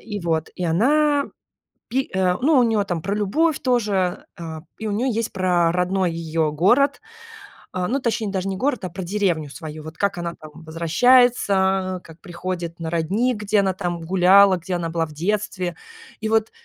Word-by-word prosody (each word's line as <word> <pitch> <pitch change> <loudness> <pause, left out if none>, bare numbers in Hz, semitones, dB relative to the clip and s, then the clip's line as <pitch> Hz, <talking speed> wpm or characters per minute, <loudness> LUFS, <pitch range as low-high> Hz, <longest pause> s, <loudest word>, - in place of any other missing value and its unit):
и 210 -2 -6
вот 160 -2 -1
и 180 - -4
она, 285 - +3 0.6
пи 260 +3 -1
э, 180 -1 +2
ну 295 -1 +4
у - - +6
нее 220 -3 +1
там 175 -4 -3
про 200 +2 -2
любовь 285 +10 +1
тоже, 205 -8 0
э, 160 -2 -6 0.2
и 220 - -5
у - - -2
нее 250 +5 0
есть 230 0 -2
про 180 -3 +2
родной 180 0 0
её 160 -1 -1
город, 255 - +3 0.7
а, 180 -1 -2
ну 275 +4 0
точнее 225 -3 -1
даже 190 -1 -2
не 190 - -3
город, 250 -4 -1
а - - -4
про 185 +2 -6
деревню 175 -6 -1
свою. 155 0 -8
Вот 160 0 -10
как 200 -2 0
она 170 -1 -4
там 155 -1 -12
возвращается, 190 +1 +3
как 165 0 -15
приходит 175 -2 -5
на 165 -1 -4
родник, 200 +9 0
где 210 0 +1
она 190 -1 0
там 175 -2 -4
гуляла, 190 +2 +5
где 180 +2 -6
она 170 -1 -2
была 165 0 -1
в 155 - -12
детстве. 185 +1 -2 0.5
И 220 - -1
вот 220 0 +1
185 Hz, 185 wpm, -22 LUFS, 170-215 Hz, 0.7 s, у